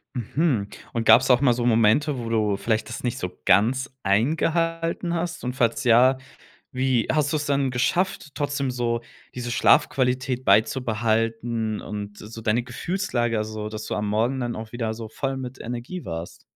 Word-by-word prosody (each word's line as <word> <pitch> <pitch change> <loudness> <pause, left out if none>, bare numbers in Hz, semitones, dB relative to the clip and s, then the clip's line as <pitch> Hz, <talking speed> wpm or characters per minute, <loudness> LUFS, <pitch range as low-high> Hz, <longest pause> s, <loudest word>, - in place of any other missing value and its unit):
Mhm, 125 -2 0 0.3
und 115 -1 -1
gab's 130 +2 +7
auch 125 - +4
mal 130 -4 +4
so 120 0 -2
Momente, 120 +5 +3
wo 115 -1 -5
du 105 -3 +1
vielleicht 110 +1 -1
das 115 - -6
nicht 125 0 -1
so 90 - -4
ganz 130 +7 +3
eingehalten 165 - 0
hast 170 -1 -3
und 125 - -2
falls 120 -3 +1
ja, 125 +3 +5 0.5
wie 130 -3 +1
hast 150 -1 +1
du 155 - +1
es 150 - -3
dann 140 -2 +1
geschafft, 150 +5 0
trotzdem 145 -2 -1
so 120 -1 -1 0.3
diese 120 -1 -4
Schlafqualität 130 0 +2
beizubehalten 115 -1 +1
und 105 0 -6
so 115 +2 -9
deine 110 +2 +1
Gefühlslage 120 - -2
also, 110 0 -4
dass 110 0 -6
du - - -4
am 105 0 -2
Morgen 115 +5 +1
dann 120 -2 -2
auch 110 0 -7
wieder 115 -2 -2
so 110 -1 -7
voll 135 +3 -3
mit 130 0 -7
Energie 120 +9 -6
warst? 85 0 -6
120 Hz, 170 wpm, -24 LUFS, 110-135 Hz, 0.5 s, gab's